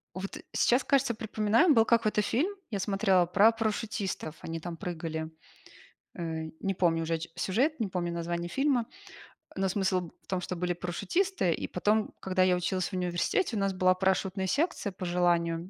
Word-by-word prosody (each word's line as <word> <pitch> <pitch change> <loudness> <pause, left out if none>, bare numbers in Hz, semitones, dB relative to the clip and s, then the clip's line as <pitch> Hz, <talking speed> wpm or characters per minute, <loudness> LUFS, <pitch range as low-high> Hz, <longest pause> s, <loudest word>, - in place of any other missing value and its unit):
Вот 190 +1 -5 0.2
сейчас, 250 +2 +3
кажется, 275 -3 +2
припоминаю, 220 - +3
был 225 -2 +5
какой-то 220 -2 +2
фильм, 315 - 0 0.2
я 200 - -2
смотрела, 195 -2 +2
про 200 +6 +5
парашютистов, 215 -7 -3
они 165 0 -5
там 170 +1 -6
прыгали. 160 -2 -4 0.8
Э, 160 -2 -4
не 195 0 -1
помню 165 -3 +1
уже 165 +1 -1
о 165 - +1
ч 165 - -7
сюжет, 260 - 0
не 220 - 0
помню 175 -2 -2
название 170 0 -3
фильма, 270 0 +1 0.7
э, - - -5
но 195 - +2
смысл 190 -1 +1
б 170 - -9
в - - -31
том, 185 - -1
что 180 - -4
были 180 +1 -1
парашютисты, 185 - 0
и - - -4
потом, 210 +4 0
когда 185 -1 +2
я 180 -1 +4
училась 180 +1 -1
в - - -16
университете, 185 - 0
у - - 0
нас 195 -1 +1
была 185 0 +4
парашютная 190 0 0
секция 285 - 0
по 185 -1 -6
желанию, 175 -1 +1
190 Hz, 185 wpm, -29 LUFS, 175-220 Hz, 0.8 s, был